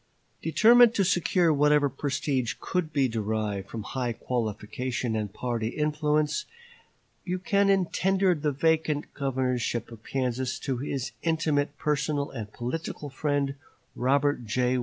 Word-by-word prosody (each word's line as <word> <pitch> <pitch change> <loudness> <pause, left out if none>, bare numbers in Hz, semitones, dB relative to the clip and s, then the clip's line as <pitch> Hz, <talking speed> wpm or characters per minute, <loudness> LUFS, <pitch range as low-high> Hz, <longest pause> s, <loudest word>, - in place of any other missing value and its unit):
Determined 230 +8 +6
to 200 - +3
secure 175 -2 +3
whatever 150 0 +4
prestige 135 -3 -1
could 180 -4 -2
be 140 -3 +2
derived 105 -3 -2
from 110 -2 -5
high 125 +1 -2
qualification 115 +1 -3
and 105 -2 -2
party 115 0 -2
influence, 150 - 0 0.8
Buchanan 195 +1 +2
tendered 190 -2 +1
the 150 -1 +1
vacant 155 0 0
governorship 125 -4 -1
of 115 -1 -12
Kansas 130 -1 -2
to 135 -3 -3
his 135 -1 -3
intimate 155 -3 0
personal 145 -1 -1
and 110 -5 -6
political 145 +4 -5
friend, 140 0 0 0.4
Robert 140 +1 +1
J. 125 +3 +1
140 Hz, 120 wpm, -27 LUFS, 125-155 Hz, 0.8 s, Determined